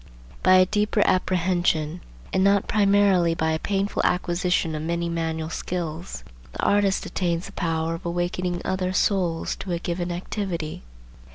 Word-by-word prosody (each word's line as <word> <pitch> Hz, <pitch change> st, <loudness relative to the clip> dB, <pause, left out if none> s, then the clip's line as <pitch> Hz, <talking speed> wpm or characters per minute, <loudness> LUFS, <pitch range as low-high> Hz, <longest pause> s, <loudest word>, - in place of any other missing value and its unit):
By 185 Hz, 0 st, +6 dB
a 185 Hz, 0 st, +7 dB
deeper 210 Hz, +2 st, +1 dB
apprehension, 175 Hz, -3 st, +1 dB, 0.3 s
and 190 Hz, -, +3 dB
not 200 Hz, 0 st, +3 dB
primarily 200 Hz, -4 st, +3 dB
by 160 Hz, -1 st, 0 dB
a 160 Hz, -, 0 dB
painful 200 Hz, +2 st, -1 dB
acquisition 180 Hz, -2 st, +1 dB
of 155 Hz, -, -3 dB
many 170 Hz, +1 st, -1 dB
manual 160 Hz, -1 st, -2 dB
skills, 175 Hz, 0 st, -4 dB, 0.3 s
the -, -, -5 dB
artist 200 Hz, -1 st, +2 dB
attains 175 Hz, -2 st, -1 dB
the -, -, -9 dB
power 165 Hz, -3 st, -1 dB
of 165 Hz, -, -7 dB
awakening 175 Hz, +1 st, -2 dB
other 185 Hz, -1 st, -1 dB
souls 180 Hz, -4 st, +1 dB
to 185 Hz, -, -4 dB
a -, -, 0 dB
given 175 Hz, +1 st, -3 dB
activity. 175 Hz, -3 st, -4 dB
175 Hz, 150 wpm, -24 LUFS, 165-190 Hz, 0.3 s, a